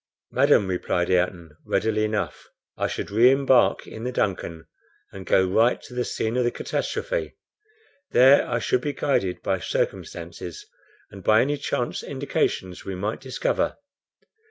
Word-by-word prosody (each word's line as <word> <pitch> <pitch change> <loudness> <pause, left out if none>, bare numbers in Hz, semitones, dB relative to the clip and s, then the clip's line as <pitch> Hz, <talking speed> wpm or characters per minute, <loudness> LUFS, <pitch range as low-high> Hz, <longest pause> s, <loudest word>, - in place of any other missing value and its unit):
"Madam," 100 - +4
replied 90 -1 -1
Ayrton, 90 -3 0
readily 110 -1 0
enough, 105 -1 -3 0.3
"I - - -1
should - - -5
re 115 +4 +6
embark 135 -2 +3
in 110 - -9
the 125 - -2
DUNCAN, 85 -7 -2 0.5
and 95 -1 -10
go 95 - +4
right 110 +6 +3
to - - -12
the 125 0 -1
scene 110 -1 -2
of 125 - +2
the 120 - +2
catastrophe. - - -3 0.7
There 135 +3 +6
I - - +1
should 125 - 0
be 145 +1 -2
guided 95 -13 -1
by - - 0
circumstances, 85 0 -4 0.5
and 95 -1 -11
by 110 +4 +5
any 145 +3 +1
chance 140 - -2
indications 90 -1 -2
we 95 - -5
might 105 +4 -3
discover." 130 -2 -1
110 Hz, 150 wpm, -24 LUFS, 90-125 Hz, 0.7 s, re